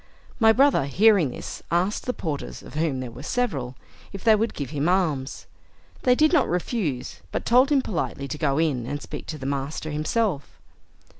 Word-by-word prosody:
My 220 Hz, -2 st, +6 dB
brother, 265 Hz, -, +4 dB
hearing 195 Hz, 0 st, +4 dB
this, -, -, -7 dB
asked 180 Hz, +8 st, 0 dB
the -, -, +2 dB
porters, 155 Hz, -9 st, -5 dB
of -, -, -12 dB
whom 150 Hz, -4 st, -1 dB
there 125 Hz, -2 st, -6 dB
were 120 Hz, +3 st, -10 dB
several, 140 Hz, -, -2 dB, 0.4 s
if 195 Hz, -, -8 dB
they 220 Hz, -1 st, +6 dB
would 225 Hz, +2 st, -1 dB
give 140 Hz, -4 st, -5 dB
him 150 Hz, +2 st, 0 dB
alms. 155 Hz, -8 st, 0 dB, 0.6 s
They 250 Hz, -1 st, +4 dB
did 310 Hz, +5 st, +3 dB
not 300 Hz, -6 st, +3 dB
refuse, 175 Hz, -, -2 dB
but -, -, -3 dB
told 255 Hz, +5 st, +4 dB
him 275 Hz, -3 st, +3 dB
politely 150 Hz, -7 st, -3 dB
to 150 Hz, -, -4 dB
go 140 Hz, -3 st, +1 dB
in, 140 Hz, -7 st, 0 dB
and 145 Hz, +2 st, -3 dB
speak -, -, -8 dB
to 155 Hz, -, -5 dB
the 135 Hz, -, -8 dB
master 140 Hz, +3 st, -3 dB
himself. 155 Hz, -, -1 dB
160 Hz, 190 wpm, -24 LUFS, 140-220 Hz, 0.6 s, My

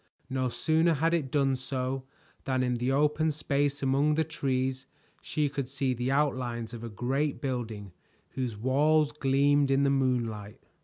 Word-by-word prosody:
No 130 Hz, -1 st, 0 dB
sooner 160 Hz, +5 st, +2 dB
had 165 Hz, +4 st, +1 dB
it 155 Hz, -6 st, 0 dB
done 135 Hz, -1 st, +2 dB
so 130 Hz, 0 st, -3 dB, 0.4 s
than 130 Hz, -1 st, +1 dB
in 125 Hz, -1 st, 0 dB
the 125 Hz, +2 st, 0 dB
open 150 Hz, +3 st, +2 dB
space 145 Hz, -1 st, -1 dB
among 140 Hz, +3 st, +2 dB
the 160 Hz, -, +2 dB
trees 130 Hz, -4 st, -2 dB, 0.3 s
she 150 Hz, -2 st, -1 dB
could 140 Hz, -2 st, -4 dB
see 135 Hz, -1 st, -1 dB
the 125 Hz, +1 st, -2 dB
outlines 125 Hz, -5 st, -1 dB
of 120 Hz, -1 st, -7 dB
a 115 Hz, -, -5 dB
great 135 Hz, +7 st, -1 dB
building 115 Hz, -7 st, -4 dB, 0.4 s
whose 125 Hz, -5 st, -3 dB
walls 145 Hz, +6 st, +3 dB
gleamed 140 Hz, 0 st, +2 dB
in 135 Hz, +1 st, +3 dB
the 140 Hz, -, +3 dB
moonlight. 120 Hz, -5 st, -1 dB
135 Hz, 160 wpm, -29 LUFS, 125-145 Hz, 0.4 s, walls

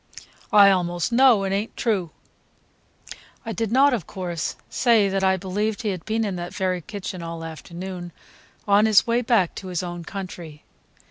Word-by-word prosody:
"I 200 Hz, -1 st, +8 dB
almost 175 Hz, +1 st, -1 dB
know 240 Hz, -4 st, +5 dB
it 195 Hz, 0 st, -1 dB
is 200 Hz, +2 st, 0 dB
n't -, -, -24 dB
true." 200 Hz, -8 st, 0 dB, 1.4 s
I 225 Hz, -, -4 dB
did 225 Hz, 0 st, -2 dB
not, 275 Hz, +3 st, +5 dB
of 210 Hz, -10 st, -3 dB
course, 175 Hz, -4 st, -4 dB
say 230 Hz, -5 st, +3 dB
that 195 Hz, 0 st, -1 dB
I 190 Hz, 0 st, +3 dB
believed 205 Hz, +4 st, -2 dB
he 215 Hz, -, 0 dB
had 180 Hz, -4 st, -5 dB
been 220 Hz, +1 st, 0 dB
in 195 Hz, -3 st, -3 dB
that 175 Hz, 0 st, -6 dB
very 185 Hz, -2 st, -1 dB
kitchen 185 Hz, -1 st, -7 dB
all 165 Hz, 0 st, -6 dB
afternoon, 175 Hz, +2 st, -7 dB, 0.6 s
on 205 Hz, +2 st, +5 dB
his 215 Hz, -1 st, +5 dB
way 235 Hz, 0 st, +1 dB
back 225 Hz, -7 st, +2 dB
to 190 Hz, -, -7 dB
his 180 Hz, -1 st, -3 dB
own 175 Hz, -1 st, -6 dB
country. 175 Hz, -5 st, -8 dB
190 Hz, 180 wpm, -23 LUFS, 175-220 Hz, 1.4 s, I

